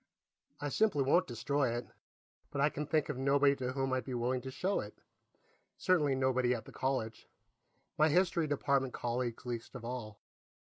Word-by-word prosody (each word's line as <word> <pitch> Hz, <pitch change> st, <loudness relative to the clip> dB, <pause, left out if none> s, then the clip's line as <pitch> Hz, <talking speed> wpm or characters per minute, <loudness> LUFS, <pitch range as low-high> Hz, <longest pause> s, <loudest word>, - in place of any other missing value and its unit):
I 145 Hz, -, -2 dB
simply 195 Hz, -4 st, +2 dB
won't 170 Hz, +7 st, +3 dB
destroy 120 Hz, +1 st, 0 dB
it, 120 Hz, -, -4 dB, 0.6 s
but 140 Hz, -, -4 dB
I 145 Hz, +2 st, +4 dB
can 150 Hz, 0 st, -4 dB
think 155 Hz, -1 st, +1 dB
of 130 Hz, -, -4 dB
nobody 140 Hz, +1 st, +4 dB
to 130 Hz, -1 st, -2 dB
whom 135 Hz, -1 st, -1 dB
I'd 130 Hz, -, 0 dB
be 130 Hz, -, -4 dB
willing 125 Hz, +2 st, 0 dB
to 130 Hz, -, -6 dB
show 180 Hz, +9 st, -1 dB
it -, -, -6 dB, 0.8 s
certainly 150 Hz, -8 st, +2 dB
nobody 130 Hz, -1 st, +2 dB
at 115 Hz, -, -7 dB
the -, -, -11 dB
college, 130 Hz, -4 st, -2 dB, 0.7 s
my 155 Hz, +1 st, +6 dB
History 170 Hz, 0 st, +2 dB
Department 140 Hz, -2 st, +1 dB
colleagues 120 Hz, 0 st, -2 dB
least 120 Hz, +1 st, -5 dB
of 120 Hz, -2 st, -7 dB
all. 115 Hz, -4 st, -5 dB
135 Hz, 175 wpm, -33 LUFS, 125-145 Hz, 0.8 s, my